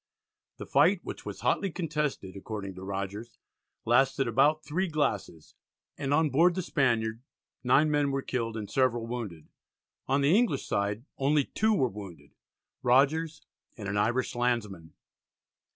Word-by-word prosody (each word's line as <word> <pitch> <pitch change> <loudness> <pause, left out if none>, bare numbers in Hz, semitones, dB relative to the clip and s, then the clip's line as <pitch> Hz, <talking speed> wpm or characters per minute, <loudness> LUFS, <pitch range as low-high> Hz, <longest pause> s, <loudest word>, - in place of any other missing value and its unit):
The - - -7
fight, - - +3
which - - -8
was - - -7
hotly 195 - +1
contested, 150 - -3
according 100 -1 -6
to 95 - -11
Rogers, 100 +4 -5 0.5
lasted 135 +2 +3
"about 145 +7 +2
three 175 +6 -1
glasses," 145 - -2 0.4
and 140 -1 -3
on 150 0 +3
board 170 +5 +4
the 185 - -2
Spaniard 115 -7 0 0.4
9 140 +5 +4
men 145 -1 +2
were 135 0 -2
killed 115 -3 -3
and 105 -2 -5
several 120 -2 +1
wounded. 110 -10 -6 0.6
On 140 +1 +2
the 145 +6 +4
English 220 - +1
side 100 +4 -2
only 145 +2 +3
two 220 0 +1
were 130 -7 +2
wounded, 100 -6 -10 0.5
Rogers 145 +5 +2 0.3
and 105 -3 -6
an 100 - -2
Irish 120 +5 0
landsman. 105 - -2
125 Hz, 145 wpm, -29 LUFS, 105-150 Hz, 0.6 s, board